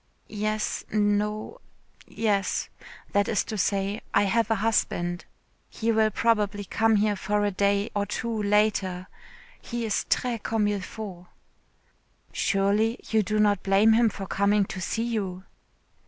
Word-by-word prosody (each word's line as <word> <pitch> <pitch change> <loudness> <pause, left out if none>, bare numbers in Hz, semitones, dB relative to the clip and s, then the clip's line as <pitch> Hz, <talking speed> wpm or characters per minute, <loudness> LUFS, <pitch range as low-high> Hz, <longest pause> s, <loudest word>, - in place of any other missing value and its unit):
"Yes 215 0 -2
No 210 - 0 0.5
Yes. 205 -3 -1 0.4
That 205 0 +2
is 215 - +1
to 220 - -6
say, 200 +1 -1
I 200 - +5
have 230 +4 +1
a 225 - +3
husband. 175 -5 0 0.4
He 230 0 -1
will 220 -1 +3
probably 210 -2 0
come 225 +3 +2
here 210 0 +2
for 205 +1 0
a 205 - +1
day 200 +2 +1
or 205 0 0
two 225 +1 -3
later. 200 -3 +1 0.6
He 235 -1 -4
is 215 - -1
très 240 -3 0
comme 220 -1 0
il 205 -1 -2
faut." 185 -3 -8 1.1
"Surely 205 +4 +1
you 220 -1 +4
do 215 +1 -1
not 205 -2 +3
blame 200 +3 +4
him 230 0 +4
for 195 -1 -7
coming 200 +1 +2
to 190 - -7
see 225 +6 -2
you." 195 -6 -3
210 Hz, 145 wpm, -26 LUFS, 200-220 Hz, 1.1 s, I